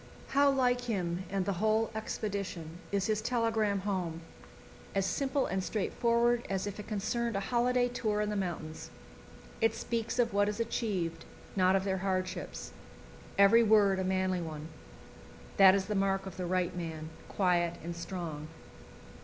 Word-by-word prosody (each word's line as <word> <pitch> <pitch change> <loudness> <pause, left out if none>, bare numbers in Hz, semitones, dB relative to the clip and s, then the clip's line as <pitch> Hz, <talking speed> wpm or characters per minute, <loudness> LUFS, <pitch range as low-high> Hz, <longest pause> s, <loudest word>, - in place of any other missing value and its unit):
How 280 +1 +4
like 250 -2 +2
him 185 -5 -2
and 195 -1 -1
the 200 - 0
whole 220 +1 +2
expedition 200 -6 -4
is 200 -2 +1
his 215 0 0
telegram 220 -4 +1
home 180 -5 -2 0.7
as 195 -1 +2
simple 275 +4 0
and 190 0 -1
straightforward 235 +4 +1
as 195 0 -1
if 205 0 -5
it 210 - -7
concerned 230 +2 -1
a - - +1
holiday 245 +3 +2
tour 220 -4 -1
in 210 0 0
the - - -2
mountains. 170 -5 -4 0.7
It 225 0 +3
speaks 230 0 -2
of 235 -3 +2
what 205 0 +3
is 210 +1 -4
achieved, 205 -7 -2 0.3
not 185 0 +4
of 190 - +2
their 190 -1 -1
hardships. 185 -1 -3 0.7
Every 200 +4 +7
word 205 -3 +4
a - - 0
manly 185 -1 0
one. 155 -1 -6 0.9
That 190 -1 +8
is 195 -1 0
the 210 - -2
mark 195 -1 +1
of 190 - -7
the 180 -1 -3
right 180 -1 0
man, 160 -2 -5 0.2
quiet 175 -3 +2
and 170 +1 -5
strong. 170 -4 -5
195 Hz, 160 wpm, -31 LUFS, 185-225 Hz, 0.9 s, That